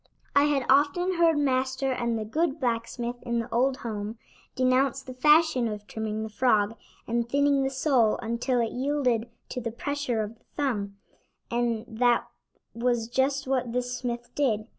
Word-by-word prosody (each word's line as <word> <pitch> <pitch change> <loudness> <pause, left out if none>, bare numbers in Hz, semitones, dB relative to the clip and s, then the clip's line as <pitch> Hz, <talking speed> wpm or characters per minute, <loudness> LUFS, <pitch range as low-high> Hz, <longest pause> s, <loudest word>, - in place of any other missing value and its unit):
I 285 0 +6
had 285 -3 +1
often 300 +7 +3
heard 330 -2 +4
Master 265 -1 +1
and 235 -2 -1
the 215 - -3
good 310 +6 0
blacksmith 240 -1 -2
in 235 -1 -2
the 230 - -3
old 260 +3 +2
home 215 0 -4 0.4
denounce 260 +1 +2
the 255 - -8
fashion 300 -2 +4
of 210 -1 -5
trimming 220 0 -4
the 220 - -5
frog 215 -2 +2 0.3
and 235 0 -1
thinning 280 +1 +3
the 270 - +1
sole 260 -5 +2
until 235 +2 -1
it 230 - -1
yielded 250 -4 0 0.2
to 250 - -4
the 230 - -3
pressure 250 -1 -2
of 220 +2 -8
the - - -34
thumb, 210 -9 -2 0.5
and 235 -1 0
that 240 +1 +2 0.5
was 235 -1 0
just 270 +2 +1
what 255 -3 -1
this 250 0 -1
smith 240 -1 -4
did. 225 -7 +1
245 Hz, 165 wpm, -27 LUFS, 230-275 Hz, 0.5 s, I